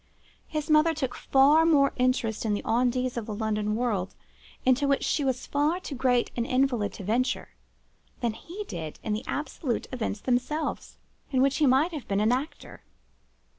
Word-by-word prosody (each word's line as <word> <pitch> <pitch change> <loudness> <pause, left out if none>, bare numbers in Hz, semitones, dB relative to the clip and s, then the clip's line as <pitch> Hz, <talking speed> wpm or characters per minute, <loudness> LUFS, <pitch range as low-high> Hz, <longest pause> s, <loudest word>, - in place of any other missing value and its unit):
His 305 -1 -3
mother 310 +1 +4
took 265 -5 -2
far 285 +4 +4
more 290 -4 +4
interest 250 -4 0
in 215 -2 0
the - - -4
on 245 +2 +2
dits 255 0 -2
of 225 - -4
the 215 - -4
London 210 -1 -1
world, 215 -6 -1 0.5
into 260 +2 +3
which 275 0 +1
she 295 - 0
was 260 -2 -1
far 300 +5 +1
too 345 - -7
great 250 -2 +1
an 235 - 0
invalid 255 -4 +1
to 205 - -8
venture, 250 +6 0 0.7
than 235 -3 -1
he 360 - -8
did 160 -4 -6
in 215 - -1
the 215 +3 -3
absolute 280 -3 -3
events 225 -4 -3
themselves, 260 +5 -2 0.3
in 260 -2 +2
which 275 0 +2
he 300 - +3
might 270 +7 +3
have 295 -5 -6
been 200 0 0
an 215 +2 +3
actor. 265 +5 -4
255 Hz, 180 wpm, -27 LUFS, 225-285 Hz, 0.7 s, mother